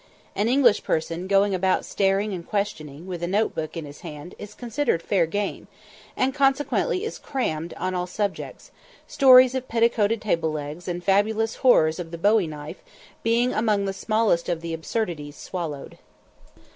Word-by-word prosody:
An 205 - +1
English 245 -4 +4
person 165 +3 -2
going 200 +1 +3
about 185 0 +1
staring 195 +1 0
and 175 -2 -5
questioning, 170 -7 -3
with 180 -2 -6
a 175 - -1
note 205 +4 +1
book 160 +1 -5
in 160 - -5
his 145 0 -12
hand, 160 +1 -9
is 210 0 -9
considered 245 - -1
"fair 170 0 +1
game," 205 +4 -3 0.5
and 260 +1 +1
consequently 285 +8 +1
is 450 - -5
"crammed" 165 - -3
on 185 - -3
all 180 0 -2
subjects; 200 +2 -4 0.3
stories 255 -2 +6
of 260 -1 -3
petticoated 230 -1 +2
table 165 -7 0
legs, 155 +3 -6
and 175 0 -4
fabulous 215 +3 +1
horrors 160 - +4
of 170 -2 -5
the 170 - -7
bowie 205 +1 +3
knife, 150 -1 -8 0.4
being 235 +2 +2
among 215 -2 +1
the 195 - -2
smallest 215 -4 +1
of 170 -2 -1
the 170 -1 -5
absurdities 160 -4 -3
swallowed. 160 -6 -6
195 Hz, 165 wpm, -24 LUFS, 165-225 Hz, 0.5 s, stories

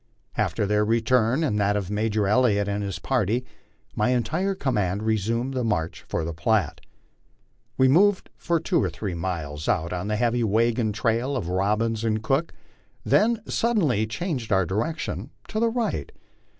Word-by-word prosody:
After - - 0
their 105 +1 +2
return 115 +5 +2
and 105 -9 0
that 100 0 +2
of 100 -1 -4
Major 105 -1 0
Elliott 105 -2 +3
and 100 0 -1
his 100 -3 -3
party, 120 +3 0 0.5
my 105 +3 +1
entire 165 +11 0
command 105 - -1
resumed 115 +4 0
the 130 -1 -1
march 85 -8 -2
for 80 - -1
the 85 - -4
Platte. 100 - 0 1.0
We 130 - +5
moved 190 +8 +3
for 170 -1 0
two 170 +1 +1
or - - 0
three 100 -4 -5
miles 80 -4 -4
out 85 0 0
on 90 +2 -3
the 105 - 0
heavy 120 +2 +1
wagon 115 +1 +2
trail 115 +5 0
of 90 -8 -4
Robbins 105 +4 0
and 110 -1 0
Cook, 135 +7 0 0.5
then 225 0 +3
suddenly 155 - +1
changed 125 - -3
our 95 -2 +3
direction 115 - -3 0.2
to 215 - -2
the 230 0 +3
right. 230 -1 -2
110 Hz, 165 wpm, -25 LUFS, 100-130 Hz, 1.0 s, We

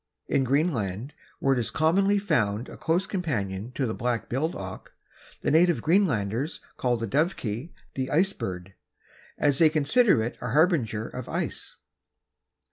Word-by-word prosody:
In 135 - +1
Greenland, 130 - 0 0.2
where 135 - +2
it 130 - 0
is 115 - -2
commonly 195 +6 +3
found 120 - 0
a - - -9
close 170 +4 0
companion 120 - -3
of 135 - +1
the 110 - -2
black 120 -1 -2
billed 155 +7 -1
auk, 95 -1 -8 0.5
the - - +1
native 170 +2 +4
Greenlanders 145 - +1 0.2
call 125 -1 0
the 115 - -3
Dovekie 135 - -1 0.2
the 130 -1 -3
Ice 190 +6 +2
Bird, 90 - -6 0.6
as 140 -2 +2
they 160 - +7
consider 155 - +3
it 120 - -5
a 125 -1 -3
harbinger 140 - +2
of 125 -1 -7
ice. - - -4
135 Hz, 150 wpm, -26 LUFS, 115-165 Hz, 0.6 s, they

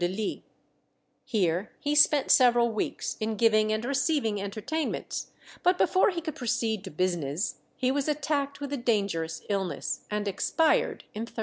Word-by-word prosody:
Here 185 -2 0
he 290 - -1
spent 295 -1 +5
several 240 -2 +5
weeks 215 - -3
in 220 0 -1
giving 215 0 +3
and 215 +2 -1
receiving 275 -6 0
entertainments; 215 +11 -3 0.3
but 360 +1 +3
before 375 +3 +4
he 345 -3 -3
could 315 -2 -4
proceed 230 -4 -1
to - - -6
business, 175 -1 -1 0.2
he 255 -1 +1
was 280 +1 -1
attacked 290 -1 -1
with 285 0 -5
a - - 0
dangerous 200 -9 -1
illness, 190 -7 -2
and 210 0 -2
expired 315 - +1
in 215 - -5
1364. - - -23
225 Hz, 145 wpm, -28 LUFS, 200-285 Hz, 0.3 s, spent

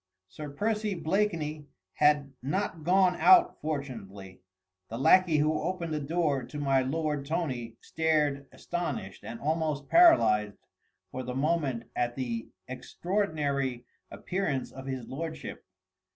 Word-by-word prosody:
Sir 150 +8 -8
Percy 210 +6 -1
Blakeney 160 -5 -1 0.3
had 145 -2 +2
not 165 +4 -2
gone 180 +1 +4
out 360 -1 +5
fortunately: 110 -11 -6 0.5
the 115 - -5
lacquey 170 +4 +5
who 155 +1 +1
opened 170 -1 -3
the 155 - -1
door 150 -2 0
to 125 +4 -8
my 135 -2 +2
lord 150 +1 -1
Tony 135 -7 -3
stared 150 -3 0
astonished 150 - -5
and 115 - -7
almost 155 -1 -1
paralysed 110 - +5 0.5
for 130 - -4
the 125 0 -5
moment 140 -4 0
at 120 0 -1
the 120 -4 -3 0.2
extraordinary 140 - -2 0.2
appearance 180 -8 -3
of 135 0 -9
his 130 -3 -4
lordship. 160 +3 -6
150 Hz, 125 wpm, -29 LUFS, 130-170 Hz, 0.5 s, out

